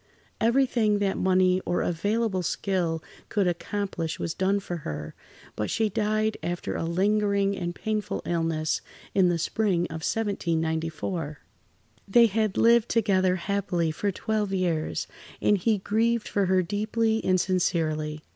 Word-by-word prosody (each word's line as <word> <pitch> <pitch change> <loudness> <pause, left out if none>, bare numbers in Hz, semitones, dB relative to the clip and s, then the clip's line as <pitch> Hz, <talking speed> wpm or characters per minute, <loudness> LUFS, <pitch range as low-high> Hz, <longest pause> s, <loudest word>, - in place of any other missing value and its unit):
Everything 230 -3 +3
that 200 -1 0
money 185 0 +3
or 175 - 0
available 205 +3 0
skill 175 -3 -1 0.3
could 205 -3 +1
accomplish 175 -2 -2
was 165 - -3
done 195 +2 +1
for 175 -3 -5
her, 75 - -6 0.4
but 105 - -2
she 220 -1 +1
died 215 +2 0
after 175 0 -3
a - - -2
lingering 200 +3 +1
and 175 -2 -4
painful 215 -2 -2
illness, 165 -2 0 0.3
in 190 -2 +4
the 175 - +1
spring 180 +1 0
of 160 - -5
1794. 165 - -2 0.7
They 235 +4 +6
had 215 -2 0
lived 235 0 +5
together 190 -5 +2
happily 185 -3 -1
for 200 +6 -1
twelve 210 +1 -2
years, 175 -5 -1 0.3
and 210 - +3
he 210 +3 +1
grieved 225 +3 0
for 200 -2 0
her 185 0 +3
deeply 220 +4 0
and 185 0 +3
sincerely. 155 -4 0
190 Hz, 135 wpm, -26 LUFS, 170-210 Hz, 0.7 s, They